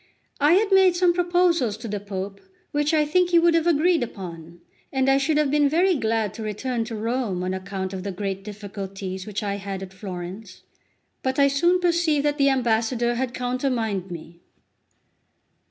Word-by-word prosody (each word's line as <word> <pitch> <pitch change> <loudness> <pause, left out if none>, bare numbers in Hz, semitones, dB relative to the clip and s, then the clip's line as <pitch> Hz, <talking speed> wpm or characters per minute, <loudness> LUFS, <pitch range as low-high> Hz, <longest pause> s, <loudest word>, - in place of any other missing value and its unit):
I 295 +3 +5
had 405 +2 +3
made 380 -2 +5
some 350 0 +3
proposals 345 - +2
to 230 - -7
the 205 -1 -3
Pope, 195 0 -6 0.3
which 295 +1 +1
I 305 -2 +3
think 355 +4 +2
he 345 - +4
would 335 0 +5
have 330 0 +2
agreed 335 +1 +3
upon, 170 -7 -7 0.3
and 265 -1 +1
I 270 0 +4
should 300 +2 +1
have 300 -2 +2
been 290 -1 +3
very 360 +5 +3
glad 225 - 0
to 230 - -8
return 225 +3 -2
to 225 0 -6
Rome 220 -4 -2
on 185 0 -2
account 190 0 -4
of 190 - -4
the 200 +1 -4
great 195 +1 -4
difficulties 195 -2 -6
which 210 +1 -4
I 200 -1 -2
had 195 -1 -5
at 190 0 -10
Florence. 185 +1 -8 0.6
But 260 0 -1
I 280 -1 +5
soon 345 +6 +3
perceived 340 -4 +2
that 295 0 0
the 275 0 +5
ambassador 240 -1 +1
had 245 0 -2
countermined 245 -6 -1
me. 170 0 -9
240 Hz, 185 wpm, -24 LUFS, 195-300 Hz, 0.6 s, I